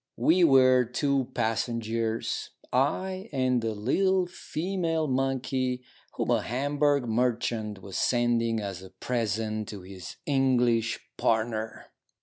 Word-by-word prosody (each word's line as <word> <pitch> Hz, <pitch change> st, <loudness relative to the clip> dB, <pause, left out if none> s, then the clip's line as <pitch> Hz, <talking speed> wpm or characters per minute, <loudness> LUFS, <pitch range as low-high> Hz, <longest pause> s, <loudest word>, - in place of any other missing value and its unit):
We 175 Hz, +3 st, +4 dB
were 130 Hz, -4 st, +6 dB
two 135 Hz, +2 st, 0 dB
passengers; 115 Hz, 0 st, -1 dB, 0.2 s
I 185 Hz, -, 0 dB
and 130 Hz, -3 st, +1 dB
a 110 Hz, -1 st, -1 dB
little 185 Hz, -, +2 dB
female 170 Hz, -1 st, -2 dB
monkey, 130 Hz, -1 st, -1 dB, 0.3 s
whom -, -, -1 dB
a -, -, +3 dB
Hamburg 145 Hz, +2 st, +1 dB
merchant 115 Hz, -3 st, -1 dB
was 100 Hz, -2 st, -4 dB
sending 120 Hz, -2 st, +2 dB
as 100 Hz, -3 st, -5 dB
a 95 Hz, -, -11 dB
present 110 Hz, -2 st, -2 dB
to 100 Hz, -3 st, -7 dB
his 95 Hz, -3 st, -9 dB
English 125 Hz, -5 st, +2 dB, 0.2 s
partner. 110 Hz, -1 st, -1 dB
125 Hz, 115 wpm, -28 LUFS, 110-140 Hz, 0.3 s, were